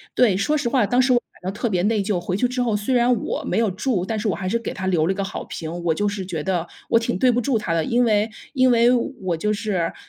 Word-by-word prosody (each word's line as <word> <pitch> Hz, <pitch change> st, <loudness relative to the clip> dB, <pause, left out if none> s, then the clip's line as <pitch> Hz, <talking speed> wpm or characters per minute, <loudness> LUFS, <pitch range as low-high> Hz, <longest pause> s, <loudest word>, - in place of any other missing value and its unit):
对， 220 Hz, -7 st, +4 dB
说 295 Hz, +11 st, +1 dB
实 280 Hz, -, -1 dB
话， 235 Hz, -3 st, +2 dB
当 245 Hz, +4 st, +3 dB
时 255 Hz, 0 st, +3 dB
我 -, -, +5 dB
感 -, -, -41 dB, 0.2 s
到 185 Hz, -, -2 dB
特 210 Hz, +4 st, -2 dB
别 180 Hz, -2 st, 0 dB
内 215 Hz, 0 st, +2 dB
疚， 195 Hz, -3 st, -1 dB
回 180 Hz, +1 st, -3 dB
去 245 Hz, +5 st, +2 dB
之 250 Hz, 0 st, -2 dB
后 230 Hz, -3 st, 0 dB
虽 210 Hz, +5 st, -1 dB
然 245 Hz, +1 st, +4 dB
我 -, -, -3 dB
没 -, -, 0 dB
有 225 Hz, -3 st, +2 dB
住， 200 Hz, 0 st, -1 dB
但 220 Hz, 0 st, -2 dB
是 215 Hz, -, -2 dB
我 190 Hz, -, +1 dB
还 185 Hz, +1 st, -3 dB
是 235 Hz, -, +1 dB
给 230 Hz, -, -5 dB
他 190 Hz, 0 st, -4 dB
留 165 Hz, -4 st, +2 dB
了 190 Hz, -, +2 dB
一 -, -, -10 dB
个 195 Hz, -, -2 dB
好 195 Hz, -, -5 dB
评。 165 Hz, +2 st, -6 dB
我 165 Hz, -2 st, +2 dB
就 205 Hz, +5 st, 0 dB
是 200 Hz, -2 st, -4 dB
觉 165 Hz, -5 st, -4 dB
得 175 Hz, -3 st, -1 dB, 0.2 s
我 230 Hz, -, +4 dB
挺 225 Hz, -, -2 dB
对 250 Hz, +5 st, +4 dB
不 240 Hz, -, +1 dB
住 245 Hz, -1 st, +1 dB
他 165 Hz, -, -2 dB
的， 160 Hz, -1 st, +1 dB
因 245 Hz, +1 st, +2 dB
为 215 Hz, -1 st, +2 dB, 0.2 s
因 255 Hz, -2 st, +4 dB
为 235 Hz, +1 st, +5 dB
我 215 Hz, -, -1 dB
就 210 Hz, +5 st, 0 dB
是， 205 Hz, -6 st, -1 dB
210 Hz, 325 characters per minute, -22 LUFS, 185-240 Hz, 0.2 s, 我